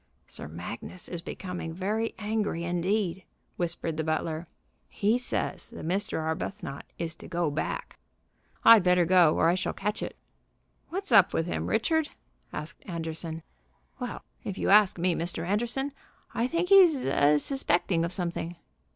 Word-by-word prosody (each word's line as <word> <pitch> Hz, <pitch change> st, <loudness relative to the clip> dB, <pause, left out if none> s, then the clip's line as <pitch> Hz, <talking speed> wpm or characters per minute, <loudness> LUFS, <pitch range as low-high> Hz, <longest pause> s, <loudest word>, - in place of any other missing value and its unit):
"Sir 70 Hz, -, -4 dB
Magnus 90 Hz, -, -7 dB
is 175 Hz, -2 st, -5 dB
becoming 175 Hz, -2 st, -6 dB
very 215 Hz, +5 st, -1 dB
angry 210 Hz, -5 st, -1 dB
indeed," 180 Hz, +2 st, 0 dB, 0.3 s
whispered 165 Hz, -2 st, -2 dB
the 160 Hz, -, 0 dB
butler. 160 Hz, +1 st, -2 dB, 0.4 s
"He 215 Hz, +4 st, +1 dB
says 250 Hz, -, -2 dB
that -, -, -8 dB
Mr. 195 Hz, +3 st, 0 dB
Arbuthnot 160 Hz, -1 st, -4 dB
is 165 Hz, -2 st, -3 dB
to -, -, -10 dB
go 170 Hz, -3 st, 0 dB
back." 145 Hz, -, -4 dB, 0.7 s
"I'd 230 Hz, -2 st, +10 dB
better 180 Hz, -1 st, +4 dB
go, 175 Hz, -3 st, +5 dB
or 165 Hz, -, +4 dB
I 170 Hz, -, +4 dB
shall 185 Hz, -, -1 dB
catch 210 Hz, +2 st, -2 dB
it." -, -, -5 dB, 0.7 s
"What's 385 Hz, -3 st, -4 dB
up 200 Hz, -5 st, +6 dB
with 165 Hz, -, +1 dB
him, 175 Hz, -, -2 dB
Richard?" 300 Hz, +8 st, +1 dB, 0.4 s
asked 155 Hz, +2 st, -6 dB
Anderson. 165 Hz, -1 st, -3 dB, 0.6 s
"Well, -, -, -5 dB, 0.2 s
if 195 Hz, -, -4 dB
you -, -, +1 dB
ask 205 Hz, -2 st, +6 dB
me, 175 Hz, +1 st, +2 dB
Mr. 170 Hz, 0 st, -3 dB
Anderson, 240 Hz, +8 st, -1 dB, 0.4 s
I 235 Hz, -, +1 dB
think 340 Hz, +5 st, -1 dB
he's 355 Hz, -9 st, +7 dB
a 145 Hz, +2 st, +4 dB
suspecting 175 Hz, -, +1 dB
of 170 Hz, -, -1 dB
something." 175 Hz, -2 st, -3 dB
180 Hz, 150 wpm, -28 LUFS, 165-215 Hz, 0.7 s, I'd